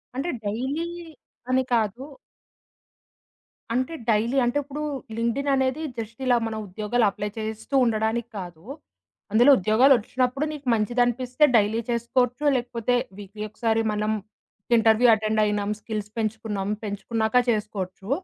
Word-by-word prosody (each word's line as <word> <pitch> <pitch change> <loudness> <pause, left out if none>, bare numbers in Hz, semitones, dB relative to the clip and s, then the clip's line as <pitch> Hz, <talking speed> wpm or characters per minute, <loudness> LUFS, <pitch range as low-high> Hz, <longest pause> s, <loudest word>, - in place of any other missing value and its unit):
అంటే 275 +6 -2 0.2
డైలీ 260 +10 -2 0.6
అని 260 0 +3
కాదు. 225 +1 0 1.7
అంటే 255 +6 -1 0.2
డైలీ 225 +4 +2
అంటే 240 +4 0
ఇప్పుడు 285 +2 -6 0.4
లింక్డ్‌ఇన్ 235 +5 0
అనేది 265 +2 0 0.2
జస్ట్ 230 +1 -6
ఇలా 250 -1 +4
మనం 220 -1 -4
ఉద్యోగాలు 215 +5 0
అప్లై 205 +1 -4
చేస్తూ 220 +4 -4
ఉండడానికి 225 +1 0
కాదు. 175 -3 -9 0.7
అందులో 240 +6 +6
ఉద్యోగాలొచ్చినప్పుడు 250 +5 +3
నీకు 285 -3 -9
మంచిదనిపిస్తే 245 +4 +1
డైలీ 215 +1 +3
చేసుకోవచ్చు. 245 +3 0
లేకపోతే 240 -1 -1 0.2
వీక్లీ 205 +1 -8
ఒకసారి 225 +1 0
మనం 210 +1 0 0.7
ఇంటర్వ్యూ 225 +2 +5
అటెండ్ 215 0 0
అయినాం. 205 -1 -1
స్కిల్స్ 210 -2 -4
పెంచుకున్నాం. 215 -2 -2
పెంచుకున్నాక 220 +3 -1
చేసుకోవచ్చు. 205 -3 -3
225 Hz, 115 wpm, -25 LUFS, 215-250 Hz, 1.7 s, అందులో